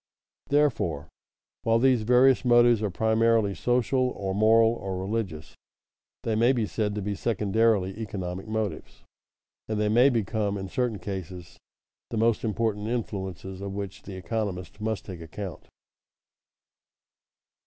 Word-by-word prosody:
Therefore, 120 - +1 0.5
while 115 0 +2
these 125 -1 +3
various 125 +4 +4
motives 120 -2 +5
are 105 - 0
primarily 110 0 +2
social 125 +5 +1
or 95 -1 -2
moral 110 +2 +5
or 95 -5 -5
religious, 95 -6 -4 0.7
they 115 - -1
may 120 +4 +4
be 115 -4 0
said 105 -1 -2
to 105 - -3
be 105 +1 -2
secondarily 105 -2 +1
economic 95 -3 -5
motives, 110 -1 -4 0.7
and 110 -1 -1
they 105 0 +1
may 120 +5 +5
become 110 -3 -1
in 95 -1 -6
certain 120 0 -1
cases 90 -2 -7 0.5
the 115 - -4
most 115 0 +2
important 110 -1 -1
influences 95 -5 -4
of 100 -1 -5
which 100 -1 -6
the 100 - -9
economist 95 0 -4
must 110 -1 -2
take 90 -4 -8
account. 90 +3 -8
105 Hz, 130 wpm, -27 LUFS, 95-115 Hz, 0.7 s, motives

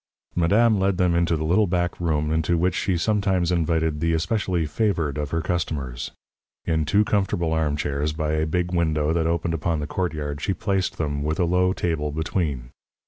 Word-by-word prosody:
Madame 105 +5 +3
led 95 -1 +1
them 90 -1 +2
into 85 -1 +2
the 75 - -3
little 95 +7 +3
back 90 -1 -1
room, 75 -3 0
into 80 +2 +1
which 90 +2 +1
she 95 -3 0
sometimes 95 -2 +1
invited 80 -2 +1
the 85 +1 +1
especially 85 0 0
favoured 80 -3 0
of 75 -2 -3
her 80 +2 -1
customers. 70 -8 -3 0.6
In 80 -1 +1
two 105 +7 +3
comfortable 90 -6 0
armchairs, 75 -1 0
by 75 0 -2
a 80 0 0
big 90 +2 -1
window 80 -3 +1
that 80 -1 +1
opened 85 0 0
upon 80 0 -1
the 75 - -3
courtyard, 75 -4 -3
she 95 - -1
placed 95 0 -1
them, 75 -2 -2
with 80 +2 -1
a 90 - +3
low 90 +2 +2
table 80 -5 -1
between. 75 -5 -2
85 Hz, 185 wpm, -24 LUFS, 75-90 Hz, 0.6 s, Madame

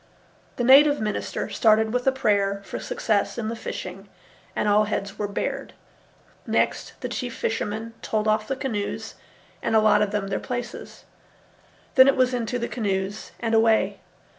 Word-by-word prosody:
The 245 - -2
native 285 +3 +7
minister 215 -1 -3
started 220 0 +3
with 250 +1 -1
a - - +6
prayer 200 -6 +1
for - - -5
success 210 0 -1
in 220 -2 -2
the 230 - -3
fishing, 195 -3 -7 0.5
and - - 0
all 210 +1 +4
heads 200 -1 -4
were 205 - -1
bared. 200 - -4 0.7
Next, - - -1
the - - -2
chief - - -4
fishermen 225 - -3
told 215 0 -1
off 215 0 +1
the 270 - -1
canoes 225 -6 -3 0.5
and - - 0
allotted 215 -1 +4
them 205 -1 -2
their 195 - -1
places. 245 -1 -6 0.9
Then 260 -2 +8
it 275 - +4
was 255 0 +3
into 245 0 -1
the 235 0 -2
canoes 200 -2 -3
and 230 -1 -1
away. 225 0 +3
220 Hz, 160 wpm, -24 LUFS, 205-245 Hz, 0.9 s, Then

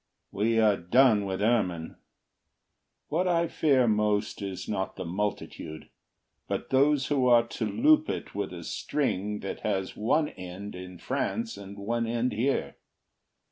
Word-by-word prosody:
We 115 +3 +1
are 105 -3 +4
done 105 +3 +4
with 95 +1 -2
ermine. 90 -8 0 1.1
What 175 +4 +1
I 170 -1 +2
fear 135 -6 +3
most 105 -1 +1
is 95 -2 -5
not 95 -2 -2
the 95 - -5
multitude, 90 -4 -4 0.6
But - - -3
those 140 +1 +4
who 135 -4 +2
are 120 -1 +6
to 110 - -2
loop 305 - +4
it - - -4
with - - -3
a - - -7
string 105 -8 -2
That 100 - -5
has 95 -3 -2
one 150 +8 +1
end 95 +3 -8
in 90 0 -9
France 225 - -2
and 100 +1 -10
one 115 +3 -1
end 120 +2 0
here. 125 +6 -1
110 Hz, 145 wpm, -28 LUFS, 100-130 Hz, 1.1 s, are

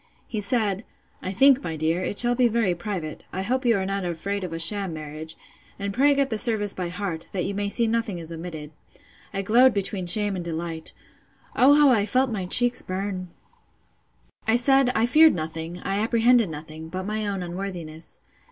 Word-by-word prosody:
He 215 - -4
said, 205 -2 0 0.4
I 185 - -4
think, 270 +6 +4
my 165 - -4
dear, 160 +3 -1
it 205 - -4
shall 240 0 +6
be 245 0 +3
very 225 -5 +1
private: 175 -3 -6
I 190 - -4
hope 255 +5 -2
you 230 -3 +4
are 190 - -2
not 195 0 -3
afraid 185 +4 -4
of 180 - -5
a 165 - -4
sham 190 +2 +2
marriage; 155 +1 -7 0.4
and 200 0 -4
pray 280 +4 +3
get 275 -2 0
the 220 - 0
service 210 -3 +3
by 180 -2 -4
heart, 175 -3 -5
that 185 -3 -2
you 200 - -3
may 200 0 -2
see 235 +3 +4
nothing 225 -4 -1
is 165 -1 -8
omitted. 160 -3 -7 0.6
I 195 - -3
glowed 240 +4 +4
between 195 -2 -3
shame 205 +1 +3
and 180 - -4
delight. 165 -1 -4 0.6
O 280 +3 +6
how 295 -1 +5
I 210 -4 +2
felt 255 +3 +1
my 195 -5 -3
cheeks 245 +5 +5
burn! 185 -1 -5 1.2
I 225 - +4
said, 270 +1 +3
I 225 - +3
feared 310 +6 +5
nothing, 160 +1 -5
I 195 +1 -1
apprehended 230 -1 +3
nothing, 155 +1 -9
but 185 +3 -5
my 215 0 -2
own 195 -2 -3
unworthiness. 175 -3 -7
195 Hz, 195 wpm, -24 LUFS, 170-230 Hz, 1.2 s, shall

